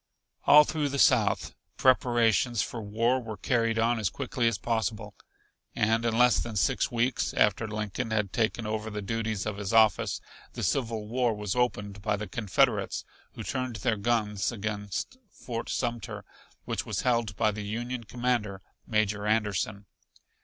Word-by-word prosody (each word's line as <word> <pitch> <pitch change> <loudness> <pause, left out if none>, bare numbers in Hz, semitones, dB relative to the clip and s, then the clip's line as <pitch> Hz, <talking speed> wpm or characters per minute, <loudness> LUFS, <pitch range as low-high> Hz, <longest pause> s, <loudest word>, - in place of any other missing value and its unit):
All 150 +1 +9
through 150 -1 -1
the 140 - -3
South 125 -6 +3 0.2
preparations 120 -2 +3
for 115 - -5
war 115 +5 +1
were 110 -3 -7
carried 115 -2 +1
on 115 +1 +2
as 105 -5 0
quickly 125 -3 -1
as 115 - +1
possible. 110 -2 -2 0.6
And 115 +2 +2
in 115 -1 +1
less 125 0 +5
than 115 -2 -4
six 125 +6 +1
weeks 120 +2 0
after 105 +2 +2
Lincoln 105 +2 -3
had 105 -3 -1
taken 115 0 0
over 110 0 -3
the 105 -1 -5
duties 110 -1 -2
of 105 -2 -3
his 100 0 -4
office, 110 -2 +4 0.3
the - - -5
Civil 115 -5 -1
War 120 0 +1
was 105 -1 -3
opened 105 -5 -1
by 105 +1 0
the 105 +1 -5
Confederates, 110 -2 +1 0.3
who - - -7
turned 130 -2 -3
their 110 0 0
guns 105 -1 0
against 105 - -4
Fort 115 -2 -6
Sumter, 120 -3 -3 0.4
which - - -2
was - - -3
held 115 -4 +1
by 110 0 +2
the 105 +1 -6
Union 120 +4 -4
commander, 120 -4 -1 0.3
Major 105 -2 0
Anderson. 105 -1 0
110 Hz, 160 wpm, -28 LUFS, 105-120 Hz, 0.6 s, All